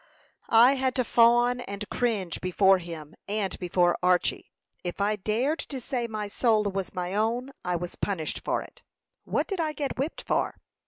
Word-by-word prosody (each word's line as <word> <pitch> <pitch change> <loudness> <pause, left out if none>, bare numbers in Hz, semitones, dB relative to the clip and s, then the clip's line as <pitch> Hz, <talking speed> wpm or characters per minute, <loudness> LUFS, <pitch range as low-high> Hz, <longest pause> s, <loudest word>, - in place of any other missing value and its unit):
"I 240 +4 +8
had 260 -1 0
to 255 - +2
fawn 240 +1 +4
and 200 -2 -6
cringe 210 -9 -1
before 190 +1 +4
him, 165 -3 -8
and 205 -1 -1
before 175 -1 +2
Archy. 180 0 +1 0.3
If 175 +1 -5
I 205 +2 +2
dared 230 - 0
to 270 - -5
say 240 -1 -2
my 215 -2 -4
soul 215 +1 +2
was 195 -2 -3
my 180 0 -3
own, 230 +5 0
I 180 0 -1
was 175 0 -4
punished 175 -6 -2
for - - -1
it. - - -16 0.4
What - - 0
did 390 -3 -4
I 310 -2 0
get 285 -4 -4
whipped 290 +5 -2
for?" - - 0
210 Hz, 175 wpm, -27 LUFS, 185-245 Hz, 0.4 s, I